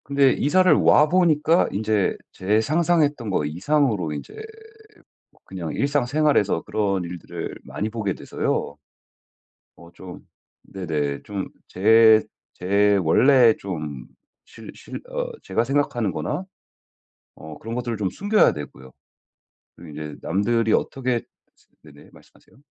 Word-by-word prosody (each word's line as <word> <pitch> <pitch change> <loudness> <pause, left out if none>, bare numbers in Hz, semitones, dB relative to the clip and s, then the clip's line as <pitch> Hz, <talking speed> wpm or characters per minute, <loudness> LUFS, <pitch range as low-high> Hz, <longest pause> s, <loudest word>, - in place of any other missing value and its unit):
근데 140 -1 +3
이사를 185 +7 +3
와 150 +1 +5
보니까 165 -1 +3
인제 105 -1 0
제 105 +4 0
상상했던 150 -3 +1
거 85 -6 0
이상으로 95 - 0
인제 70 - -8 1.1
그냥 90 -5 -6
일상생활에서 140 -4 +1
그런 100 -3 -1
일들을 85 -1 -7
많이 105 - -4
보게 105 -4 -3
돼서요. 70 - -3 1.0
어 85 0 -15
좀 90 -1 -12 0.4
네네. 75 -7 -4
좀 100 -2 -5 0.2
제 110 +3 +5 0.3
제 100 +2 +2
원래 120 - +5
좀 75 -8 -6 0.4
실 115 - -12
실 - - -9
어 - - -4
제가 115 - 0
생각하는 120 -5 0
거나 150 - -4 0.9
어 80 -1 -11
그런 115 +1 -6
것들을 120 -2 -3
좀 100 -3 -1
숨겨야 205 - +2
되고요. 70 -3 -10 0.9
또 85 - -13
이제 75 -1 -8
남들이 110 +3 0
어떻게 125 -3 -1 0.6
생 75 -1 -16
네네. 70 - -17
말씀하세요. - - -22
110 Hz, 250 characters per minute, -23 LUFS, 90-140 Hz, 1.1 s, 와